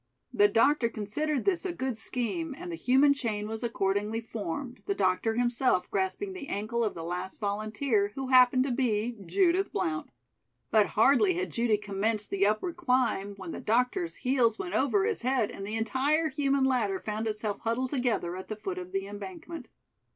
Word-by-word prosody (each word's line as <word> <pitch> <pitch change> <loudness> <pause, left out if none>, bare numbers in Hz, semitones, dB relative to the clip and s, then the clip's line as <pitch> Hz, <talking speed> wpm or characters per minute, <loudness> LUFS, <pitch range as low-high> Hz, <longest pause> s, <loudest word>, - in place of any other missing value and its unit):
The 205 - +6
doctor 230 +4 +3
considered 255 +7 -2
this 380 -3 +1
a 380 - -2
good 260 -7 -3
scheme 260 +7 -3
and 350 0 -7
the - - -3
human 280 0 +4
chain 215 -6 -3
was 220 0 -5
accordingly 210 -1 -1
formed, 230 - -5
the 400 - 0
doctor 185 - +1
himself 240 -5 +1
grasping 195 - -1
the 305 -7 -7
ankle 225 +3 -1
of 215 - -1
the 165 - -6
last 180 +3 -5
volunteer, 215 +1 0
who 270 -1 -4
happened 255 0 +6
to 270 - -2
be 240 -2 0
Judith 375 - +2
Blount. 160 -5 -2 0.6
But 215 -2 +5
hardly 285 - +5
had 370 +2 -2
Judy 230 -2 +2
commenced 210 +1 -2
the 200 0 +3
upward 215 - -1
climb, 250 - +1
when 190 -4 -7
the - - -6
doctor's 250 - 0
heels 250 -3 +2
went 360 -2 -5
over 385 +9 +2
his 445 -2 -1
head 250 -3 +1
and 195 - -7
the 215 - -3
entire 280 +8 +1
human 275 -1 +1
ladder 230 -8 +1
found 215 +1 -3
itself 210 -1 -2
huddled 240 +3 -1
together 245 -10 0
at 185 - -8
the 215 - -4
foot 190 -3 -5
of 180 +1 -9
the 195 0 -1
embankment. 330 - -8
235 Hz, 180 wpm, -29 LUFS, 205-275 Hz, 0.6 s, The